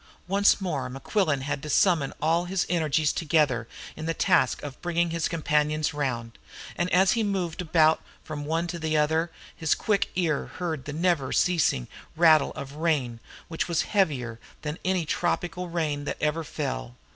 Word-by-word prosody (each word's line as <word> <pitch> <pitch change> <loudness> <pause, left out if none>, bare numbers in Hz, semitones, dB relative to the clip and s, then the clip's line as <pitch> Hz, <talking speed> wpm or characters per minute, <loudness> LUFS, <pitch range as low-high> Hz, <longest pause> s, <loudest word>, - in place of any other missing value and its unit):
Once 200 +2 +4
more 150 -10 -2
Mequillen 145 - 0
had 140 +1 -3
to 150 - -7
summon 160 -3 +3
all 165 +3 +2
his 180 0 0
energies 155 -3 +1
together 150 -8 +1 0.3
in 155 +1 -6
the 165 - -1
task 130 - +2
of 145 -2 -8
bringing 170 -1 0
his 165 -1 0
companions 150 -2 +1
round, 120 -5 -3 0.4
and 175 +1 -1
as 190 +2 +5
he 230 - +1
moved 190 -5 -1
about 160 -2 +3 0.2
from 150 -2 -6
one 165 +3 -1
to 170 0 -5
the 155 -1 0
other 160 +3 +2 0.3
his 160 -2 +1
quick 205 -3 0
ear 165 -5 0
heard 160 -6 -3
the 145 - -5
never 165 -4 +1
ceasing 160 - +2 0.3
rattle 160 -3 +5
of 140 -1 -6
the 145 - -12
rain, 145 -8 0 0.3
which 165 - -2
was 170 -2 +1
heavier 135 - 0 0.2
than 150 +2 -4
any 185 -2 +1
tropical 175 +2 -1
rain 155 -4 -2
that - - -3
ever 155 +2 0
fell. - - -4
160 Hz, 170 wpm, -26 LUFS, 145-175 Hz, 0.4 s, as